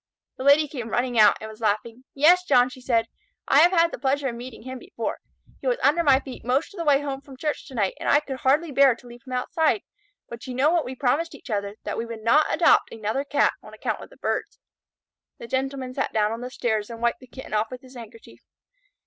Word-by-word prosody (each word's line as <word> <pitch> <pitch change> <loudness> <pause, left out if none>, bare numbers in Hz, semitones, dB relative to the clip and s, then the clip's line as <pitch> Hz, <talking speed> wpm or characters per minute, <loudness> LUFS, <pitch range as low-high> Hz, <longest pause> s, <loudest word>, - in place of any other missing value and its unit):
The - - -5
Lady 285 +2 +5
came 245 -6 -6
running 245 0 0
out 210 -1 +6
and 220 - -7
was 220 +1 -12
laughing. 225 +4 -1
"Yes, 340 +6 +5
John," 255 -7 +4
she 255 0 -12
said, 230 -3 +1 0.4
"I 280 - +5
have 345 +3 +6
had 335 -2 +3
the - - -7
pleasure 275 0 0
of - - -5
meeting 240 -1 -9
him 260 0 -7
before. 380 - -5 0.4
He - - -6
was - - +2
under 330 +4 +4
my 270 -4 +5
feet 265 -2 -10
most 260 +9 0
of 395 - -10
the - - -1
way 290 -3 +4
home 275 -2 -4
from 275 -2 -14
church 300 +2 -3
to 265 - -11
night, 200 -4 0
and - - -2
I 290 - +6
could 275 -3 -6
hardly 290 +5 +1
bear 275 -2 +5
to 245 - -19
leave 240 0 -12
him 255 - -6
outside. 315 +9 0 0.4
But 235 +2 -9
you 250 - -5
know 280 +5 +3
what 340 -2 +1
we 260 - -6
promised 280 +6 0
each 255 - -11
other, 200 -1 -2
that - - -4
we 230 - -3
would 225 -1 -8
not 295 +7 +4
adopt - - +4
another 220 +5 -2
Cat, 285 0 +2
on - - -13
account - - -3
of - - -11
the - - -18
birds." - - -3 0.8
The - - -9
Gentleman 260 +1 -3
sat 275 - -2
down 210 -1 +1
upon 230 +1 -5
the 250 - -5
stairs 220 -4 -2
and 230 -1 -8
wiped 235 0 0
the 255 - -15
Kitten 260 -2 -10
off 215 +1 +1
with 255 0 -8
his 260 0 -15
handkerchief. 230 -1 -12
260 Hz, 250 wpm, -24 LUFS, 235-285 Hz, 0.8 s, out